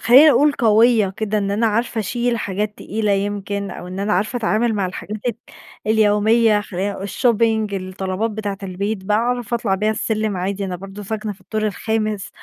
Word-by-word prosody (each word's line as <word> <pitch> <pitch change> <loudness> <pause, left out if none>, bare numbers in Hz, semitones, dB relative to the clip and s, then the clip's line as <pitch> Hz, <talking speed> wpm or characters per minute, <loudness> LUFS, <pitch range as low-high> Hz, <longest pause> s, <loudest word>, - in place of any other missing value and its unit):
خلّيني 275 +6 +8
أقول 285 +3 +4
قويّة 225 -2 +4
كده، 215 -1 -1
إن 200 -1 -1
أنا 220 +3 +1
عارفة 230 +1 0
أشيل 240 +3 -1
حاجات 210 +1 -3
تقيلة 210 -1 -1
يمكن 200 0 -2
أو 180 - -8
إن 185 +2 -5
أنا 210 +1 0
عارفة 210 +7 0
أتعامل 225 0 +1
مع 195 -2 0
الحاجات 205 +3 -6 0.7
اليوميّة 215 0 +4
خلّيني 200 0 -3
اقو 195 +1 -6
الshopping 220 -2 +1
الطلبات 190 +3 -3
بتاعة 205 -2 -4
البيت، 195 +1 -3
بأعرف 240 +3 0
أطلع 215 -4 0
بها 210 +3 +1
السلم 215 -2 -1
عادي 195 +2 -2
أنا 185 -2 -3
برضو 195 +3 -9
ساكنة 215 +1 -4
في 195 - -17
الدور 215 +3 -2
الخامس، 215 -1 -2
210 Hz, 175 wpm, -20 LUFS, 200-225 Hz, 0.7 s, خلّيني